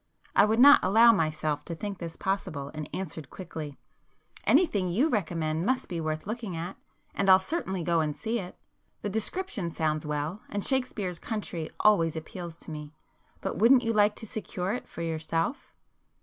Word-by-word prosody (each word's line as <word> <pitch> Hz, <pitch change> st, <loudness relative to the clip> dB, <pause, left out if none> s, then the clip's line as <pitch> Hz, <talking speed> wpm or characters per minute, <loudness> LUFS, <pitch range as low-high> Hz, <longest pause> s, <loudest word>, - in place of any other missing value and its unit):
I 200 Hz, -, +7 dB
would 220 Hz, +1 st, +1 dB
not 285 Hz, +3 st, +9 dB
allow 225 Hz, +5 st, +7 dB
myself 155 Hz, -5 st, 0 dB
to 170 Hz, -, -5 dB
think 200 Hz, +2 st, -5 dB
this 165 Hz, -1 st, -6 dB
possible, 155 Hz, -8 st, -3 dB
and 155 Hz, -1 st, -6 dB
answered 160 Hz, -5 st, -5 dB
quickly,— 160 Hz, -6 st, -7 dB, 0.7 s
"Anything 275 Hz, -, +3 dB
you 230 Hz, -, +2 dB
recommend 165 Hz, -, -1 dB
must 255 Hz, +5 st, 0 dB
be 170 Hz, -3 st, -3 dB
worth 155 Hz, 0 st, -3 dB
looking 215 Hz, -4 st, -4 dB
at, 165 Hz, +2 st, -5 dB, 0.4 s
and 195 Hz, -1 st, +1 dB
I'll 185 Hz, -, +10 dB
certainly 190 Hz, -, -3 dB
go 170 Hz, -1 st, +2 dB
and 150 Hz, -2 st, -1 dB
see 230 Hz, +6 st, -2 dB
it. 180 Hz, -3 st, -8 dB, 0.5 s
The 205 Hz, -, -1 dB
description 220 Hz, -, -2 dB
sounds 155 Hz, -2 st, -1 dB
well, 150 Hz, +5 st, -3 dB
and 205 Hz, -1 st, -2 dB
Shakespeare's 220 Hz, -10 st, -1 dB
country 190 Hz, -7 st, -4 dB
always 165 Hz, -7 st, +4 dB
appeals 165 Hz, +1 st, -7 dB
to -, -, -8 dB
me. 150 Hz, 0 st, -8 dB, 0.5 s
But -, -, -3 dB
wouldn't 245 Hz, +4 st, +6 dB
you 230 Hz, 0 st, 0 dB
like 210 Hz, 0 st, +4 dB
to 225 Hz, -, -8 dB
secure 200 Hz, -4 st, -3 dB
it 245 Hz, -, -5 dB
for 170 Hz, -, -6 dB
yourself?" 165 Hz, -, -2 dB
180 Hz, 175 wpm, -28 LUFS, 160-215 Hz, 0.7 s, I'll